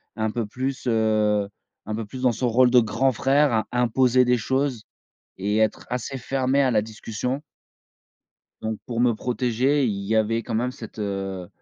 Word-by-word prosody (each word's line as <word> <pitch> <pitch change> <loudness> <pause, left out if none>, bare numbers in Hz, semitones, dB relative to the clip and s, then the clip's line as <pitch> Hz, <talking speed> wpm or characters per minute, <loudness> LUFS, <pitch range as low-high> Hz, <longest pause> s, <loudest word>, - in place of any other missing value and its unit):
un 110 -1 -1
peu 115 +1 -2
plus, 130 +6 -4
heu, 105 -3 +2 0.4
un 110 - -2
peu 110 -1 -4
plus 130 +5 -8
dans 125 -2 +4
son 125 +2 -1
rôle 125 +2 +4
de 125 0 +6
grand 120 +4 +1
frère 140 +4 +2
à 110 -1 0
imposer 125 +1 +3
des 125 0 +3
choses 130 0 -1 0.5
et 105 +3 -1
être 110 -1 0
assez 125 +2 -3
fermé 135 +2 +1
à 130 - +2
la 105 -3 +3
discussion. 115 +5 -4 1.2
Donc 110 0 -3
pour 120 -1 -4
me 120 -1 +4
protéger, 125 +4 +1
il 100 -3 -2
y 110 - 0
avait 110 +1 +1
quand 120 - -5
même 120 +3 0
cette, 110 -3 -10
heu, 95 -3 -4
115 Hz, 180 wpm, -24 LUFS, 110-130 Hz, 1.2 s, de